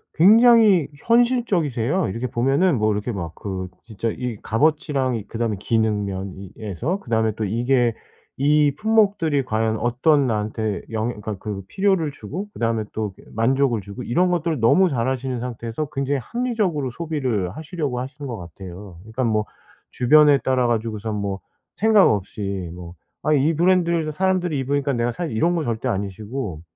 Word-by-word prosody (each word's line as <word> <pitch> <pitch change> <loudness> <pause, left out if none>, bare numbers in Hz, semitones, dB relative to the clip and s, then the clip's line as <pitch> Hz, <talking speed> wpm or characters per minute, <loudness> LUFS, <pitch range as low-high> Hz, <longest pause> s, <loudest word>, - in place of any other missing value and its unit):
굉장히 215 - +6 0.2
현실적이세요. 190 - +2
이렇게 115 +6 -3
보면은 135 +7 +2
뭐 110 0 +2
이렇게 105 +4 -2
막 85 -5 -5
그 95 -2 -5 0.2
진짜 115 0 -3
이 120 -1 -4
값어치랑 140 0 +1
이 110 - -4
그다음에 115 -2 -2
기능 110 -1 +1
면에서 100 - -4
그다음에 110 - 0
또 110 - -2
이게 120 +3 +1 0.4
이 145 +1 +3
품목들이 200 -8 +2
과연 110 -1 0
어떤 135 +4 +2
나한테 110 -1 -2
영 110 +1 -1
그니까 105 -3 -5
그 100 0 -5
필요를 190 -6 +1
주고 165 - -7
그다음에 115 -1 -1
또 105 -3 -3
그 - - -19
만족을 125 +1 +2
주고 100 +5 -8
이런 180 +11 +2
것들을 170 -4 0
너무 180 +12 +4
잘하시는 130 -1 -1
상태에서 120 +3 -4
굉장히 135 +1 -1
합리적으로 200 - -1
소비를 130 - -2
하시려고 150 -5 -3
하시는 140 +2 -7
것 120 -4 -5
같아요. 90 +1 -10
그러니깐 115 +4 -2
뭐 110 -1 +1 0.5
주변에 145 +3 +5
따라가지고선 115 -4 -1
뭐 100 -1 -3 0.4
생각 215 -2 +5
없이 100 -2 -3
뭐 85 -1 -9 0.3
'아 155 - +2
이 150 +3 +3
브랜드를 170 -2 +2
사람들이 180 -3 0
입으니까 140 +1 0
내가 120 0 0
살' 170 +4 -4
이런 165 +11 +1
거 165 - 0
절대 120 0 -2
아니시고 100 - -4
125 Hz, 360 characters per minute, -22 LUFS, 110-155 Hz, 0.5 s, 굉장히